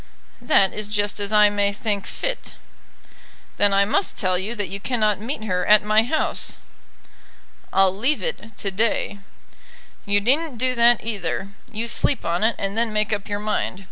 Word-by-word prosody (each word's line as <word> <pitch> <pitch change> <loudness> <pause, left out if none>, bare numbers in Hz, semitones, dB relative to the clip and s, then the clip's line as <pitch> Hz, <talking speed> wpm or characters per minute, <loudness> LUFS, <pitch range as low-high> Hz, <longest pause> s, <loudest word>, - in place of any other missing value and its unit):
"That 195 -5 +3
is 210 -1 -3
just 205 0 -1
as 205 0 -3
I 210 -1 +5
may 205 0 +1
think 205 -1 -3
fit." - - -4 1.0
"Then 205 0 +4
I 200 0 +4
must 220 - 0
tell 185 -2 +1
you 195 +6 -2
that 205 -3 -2
you 195 +3 -6
cannot 215 -3 0
meet 225 +1 -5
her 180 -4 -1
at 210 +2 +5
my 215 +1 +4
house." 250 +8 -1 1.1
"I'll 190 -1 +3
leave 260 +9 -1
it 230 - -5
to 200 - -2
day." 205 0 -1 0.9
"You 205 0 +3
needn't 270 +5 +1
do 255 +2 +1
that 235 -1 +4
either. 200 -3 -3 0.2
You 225 +2 -3
sleep 255 +2 0
on 170 +4 0
it, 225 +1 +2
and 195 0 -3
then 230 0 +1
make 215 0 0
up 205 -1 -4
your 205 - -1
mind. 210 -2 -2
210 Hz, 175 wpm, -22 LUFS, 200-230 Hz, 1.1 s, I